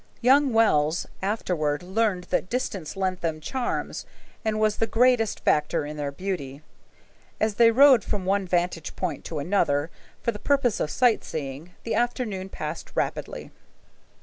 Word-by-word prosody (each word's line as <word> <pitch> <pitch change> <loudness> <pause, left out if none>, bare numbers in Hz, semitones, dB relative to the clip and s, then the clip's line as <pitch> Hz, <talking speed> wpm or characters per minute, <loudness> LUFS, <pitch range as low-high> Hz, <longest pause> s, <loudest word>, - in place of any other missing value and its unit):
Young 270 +3 +5
Wells 170 -8 +3 0.2
afterward 175 -7 -1
learned 190 -1 0
that 185 - 0
distance 195 -9 -3
lent 185 -1 -1
them 160 -2 -2
charms 250 - -3 0.4
and 215 -1 0
was 215 -1 +2
the 225 - +1
greatest 240 -2 +2
factor 150 +1 +1
in 150 +1 -6
their 145 -1 -3
beauty. 145 -4 -5 0.8
As 215 -1 +1
they 230 +2 +6
rode 260 0 +6
from 200 -4 -3
one 195 0 +1
vantage 175 -2 -1
point 170 -7 -3
to 160 - -5
another 145 -2 +1 0.3
for 235 - +1
the 210 - -9
purpose 255 -2 +1
of 150 - -1
sight 245 +2 +2
seeing, 150 +3 -6
the 230 - -2
afternoon 235 -6 -1
passed - - -6
rapidly. - - -3
190 Hz, 150 wpm, -25 LUFS, 155-225 Hz, 0.8 s, they